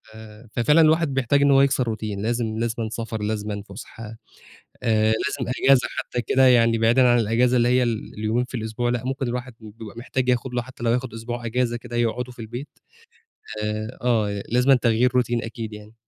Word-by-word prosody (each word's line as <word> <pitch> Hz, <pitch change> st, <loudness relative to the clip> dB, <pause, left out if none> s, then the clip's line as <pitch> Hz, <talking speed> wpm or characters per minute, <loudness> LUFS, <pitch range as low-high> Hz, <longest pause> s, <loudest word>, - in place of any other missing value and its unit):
آآ، 110 Hz, +1 st, -13 dB
ففعلًا 150 Hz, +9 st, +4 dB
الواحد 160 Hz, -2 st, +3 dB
بيحتاج 135 Hz, +2 st, +2 dB
إن 140 Hz, 0 st, +4 dB
هو 135 Hz, 0 st, +6 dB
يكسر 130 Hz, -4 st, +1 dB
routine، 105 Hz, -2 st, -5 dB
لازم 110 Hz, 0 st, -2 dB
لازمًا 115 Hz, -1 st, -2 dB
سفر، 115 Hz, -1 st, -5 dB
لازمًا 105 Hz, -1 st, -3 dB
فُسحة، 110 Hz, +2 st, -10 dB, 0.8 s
آآ، 110 Hz, -2 st, +2 dB
لازم 125 Hz, +2 st, -2 dB
أجازة 135 Hz, -2 st, +5 dB
حتى 125 Hz, -, -3 dB
كده 130 Hz, +2 st, +3 dB
يعني 115 Hz, -2 st, +4 dB
بعيدًا 120 Hz, +3 st, +4 dB
عن 120 Hz, 0 st, +4 dB
الأجازة 120 Hz, +3 st, +2 dB
اللي 120 Hz, 0 st, +3 dB
هي 125 Hz, +1 st, +3 dB
ال 115 Hz, -3 st, -3 dB
اليومين 110 Hz, +3 st, -1 dB
في 125 Hz, 0 st, -7 dB
الأسبوع، 110 Hz, +2 st, -2 dB
لأ 120 Hz, 0 st, -2 dB
ممكن 135 Hz, +1 st, -2 dB
الواحد 125 Hz, 0 st, -5 dB
ب 110 Hz, +1 st, -13 dB
بيبقى 110 Hz, -1 st, -10 dB
محتاج 125 Hz, +1 st, -2 dB
ياخد 125 Hz, 0 st, 0 dB
له 120 Hz, -, 0 dB
حتى 125 Hz, -1 st, -10 dB
لو 115 Hz, -, +2 dB
هياخد 125 Hz, 0 st, -1 dB
أسبوع 120 Hz, +1 st, -5 dB
أجازة 120 Hz, +1 st, 0 dB
كده 120 Hz, 0 st, -7 dB
يقعده 120 Hz, +1 st, -1 dB
في 125 Hz, -, -21 dB
البيت، 120 Hz, +5 st, -7 dB, 1.0 s
آآ 110 Hz, +2 st, -4 dB
آه 105 Hz, -5 st, 0 dB
لازمًا 125 Hz, +3 st, +4 dB
تغيير 120 Hz, 0 st, +2 dB
routine 120 Hz, -1 st, -2 dB
أكيد 115 Hz, -1 st, -6 dB
يعني. 105 Hz, +1 st, -11 dB
120 Hz, 195 wpm, -23 LUFS, 110-125 Hz, 1.0 s, هو